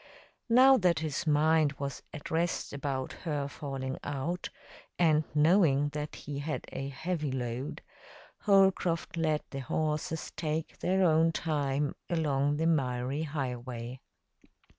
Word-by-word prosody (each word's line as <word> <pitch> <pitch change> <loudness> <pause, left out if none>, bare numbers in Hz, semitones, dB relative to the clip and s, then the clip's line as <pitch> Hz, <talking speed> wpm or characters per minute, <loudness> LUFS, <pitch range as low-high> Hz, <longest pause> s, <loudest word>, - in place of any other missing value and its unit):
Now 260 +3 +7
that 180 -5 +3
his 160 -1 -2
mind 155 0 +4
was 140 0 -5
at 150 - -8
rest 170 +2 -1
about 135 -2 -3
her 145 -4 -3
falling 135 -2 -5
out, 145 +6 -3 0.5
and 155 -3 +4
knowing 150 -3 +4
that 150 +1 -5
he 145 -1 -6
had 150 +2 -3
a 135 0 -4
heavy 155 +1 -2
load, 125 +2 -4 0.6
Holcroft 190 -3 +3
let 155 -2 0
the 135 - -4
horses 155 +3 -2
take 160 0 -3
their 190 +1 +2
own 165 -1 +4
time 145 -3 -1 0.2
along 145 -3 +1
the 160 - 0
miry 135 -3 0
highway. 125 -4 -4
150 Hz, 125 wpm, -30 LUFS, 135-165 Hz, 0.6 s, Now